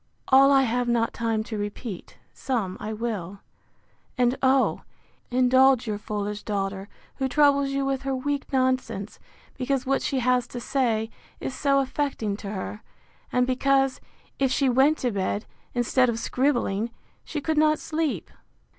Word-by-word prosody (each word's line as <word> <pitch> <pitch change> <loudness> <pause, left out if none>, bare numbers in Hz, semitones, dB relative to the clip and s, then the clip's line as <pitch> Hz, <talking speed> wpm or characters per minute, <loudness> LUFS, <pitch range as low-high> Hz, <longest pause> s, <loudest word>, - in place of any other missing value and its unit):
All 275 +1 +7
I 270 -1 +5
have 245 0 0
not 235 -1 +1
time 225 -2 -1
to 220 -1 -5
repeat: 205 -1 -6 0.2
some 220 -8 -2
I 215 - -4
will. 210 -4 -4 0.8
And 245 0 +3
oh! 265 0 +3 0.5
indulge 255 0 +4
your 210 -2 -3
foolish 210 -1 -4
daughter, 195 -1 -3 0.3
who 265 - 0
troubles 280 0 +4
you 275 0 -1
with 270 -1 -1
her 270 -1 -2
weak 285 +2 -3
nonsense; 255 -6 -1 0.4
because 265 0 0
what 270 +1 +1
she 275 - -1
has 250 -1 +2
to 245 - -6
say, 230 -3 0 0.3
is - - -4
so 275 0 +2
affecting 265 -6 -2
to 200 - -7
her; 205 +1 -5 0.5
and 250 0 +3
because, 270 +1 +1 0.4
if 270 -2 +2
she 270 0 +2
went 270 +5 +4
to 245 - -1
bed, 200 +1 -2 0.3
instead 245 +1 +3
of 230 - -1
scribbling, 235 -4 0 0.3
she 310 - -4
could 310 +1 0
not 310 0 +4
sleep. 315 -2 -2
250 Hz, 155 wpm, -25 LUFS, 220-270 Hz, 0.8 s, All